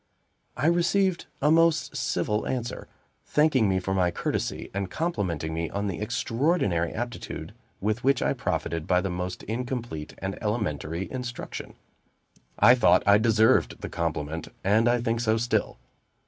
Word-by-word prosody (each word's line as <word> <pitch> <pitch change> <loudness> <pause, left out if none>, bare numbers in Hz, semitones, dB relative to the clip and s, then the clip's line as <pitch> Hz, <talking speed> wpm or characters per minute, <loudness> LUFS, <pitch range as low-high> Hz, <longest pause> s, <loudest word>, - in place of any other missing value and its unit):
I 140 - -1
received 175 +2 +2 0.2
a 150 - +5
most 165 -1 +3
civil 105 +1 -1
answer, 120 -2 -3 0.4
thanking 145 -8 +3
me 95 -1 +2
for 95 +1 -2
my 90 -2 +2
courtesy, 85 - -3
and 100 -1 -2
complimenting 95 - -2
me 80 0 -2
on 100 +1 -3
the 95 -4 -3
extraordinary 115 - 0
aptitude 120 +1 -5 0.3
with 110 +4 -1
which 135 -1 +3
I - - +2
profited 80 -1 -2
by 90 0 +3
the 95 -1 -2
most 90 +1 -4
incomplete 115 - -4
and 95 0 -5
elementary 95 - -2
instruction. 125 -2 -6 0.8
I 120 - +7
thought 125 - +4
I 100 +1 +6
deserved 110 +2 +3
the - - -5
compliment, 80 -1 -3 0.2
and 110 +4 +4
I 120 0 +2
think 115 -1 0
so 110 -1 +2
still. 120 +1 0
110 Hz, 150 wpm, -26 LUFS, 90-125 Hz, 0.8 s, I